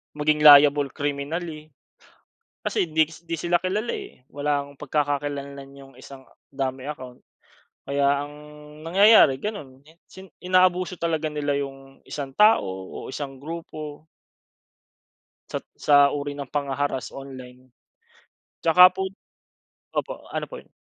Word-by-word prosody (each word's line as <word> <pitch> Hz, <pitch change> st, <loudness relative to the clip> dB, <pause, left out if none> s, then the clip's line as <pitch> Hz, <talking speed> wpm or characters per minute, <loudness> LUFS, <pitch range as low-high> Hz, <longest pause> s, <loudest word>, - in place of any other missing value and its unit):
maging 150 Hz, 0 st, +1 dB
liable 145 Hz, -1 st, +8 dB
criminally 155 Hz, +2 st, -4 dB, 0.9 s
kasi -, -, 0 dB
hindiks 160 Hz, +1 st, -1 dB
hindi 165 Hz, 0 st, -3 dB
sila 175 Hz, 0 st, +2 dB
kilala 210 Hz, +5 st, -1 dB
eh. 125 Hz, -, -10 dB
Walang 145 Hz, -1 st, -2 dB
pagkakakilanlan 140 Hz, -1 st, -3 dB
iyong 135 Hz, -1 st, -14 dB
isang 135 Hz, -1 st, -13 dB, 0.2 s
dummy 135 Hz, -1 st, -3 dB
account. 130 Hz, -4 st, -8 dB, 0.6 s
Kaya 140 Hz, 0 st, +1 dB
ang 145 Hz, 0 st, -11 dB, 0.5 s
nangyayari 190 Hz, -6 st, +6 dB
ganoon. 140 Hz, -11 st, -6 dB
In 165 Hz, +2 st, -21 dB
sin 190 Hz, 0 st, -13 dB
inaabuso 185 Hz, 0 st, +2 dB
talaga 160 Hz, -2 st, -1 dB
nila 145 Hz, -1 st, -1 dB
iyong 135 Hz, -1 st, -8 dB
isang 140 Hz, -2 st, -5 dB
tao 215 Hz, +1 st, +6 dB, 0.3 s
o -, -, -7 dB
isang 135 Hz, -1 st, -6 dB
grupo. 155 Hz, -2 st, -8 dB, 1.5 s
Sat -, -, -3 dB, 0.2 s
sa 145 Hz, -1 st, +5 dB
uri 145 Hz, 0 st, -4 dB
ng 140 Hz, -2 st, -7 dB
panghaharass 140 Hz, -2 st, -2 dB
online. 130 Hz, -2 st, -11 dB, 0.9 s
At -, -, -68 dB
saka 180 Hz, +2 st, +8 dB
po 190 Hz, 0 st, -3 dB, 0.8 s
opo, -, -, -4 dB
ano -, -, -3 dB
po -, -, -10 dB
yun? -, -, -31 dB
145 Hz, 125 wpm, -24 LUFS, 140-165 Hz, 1.5 s, liable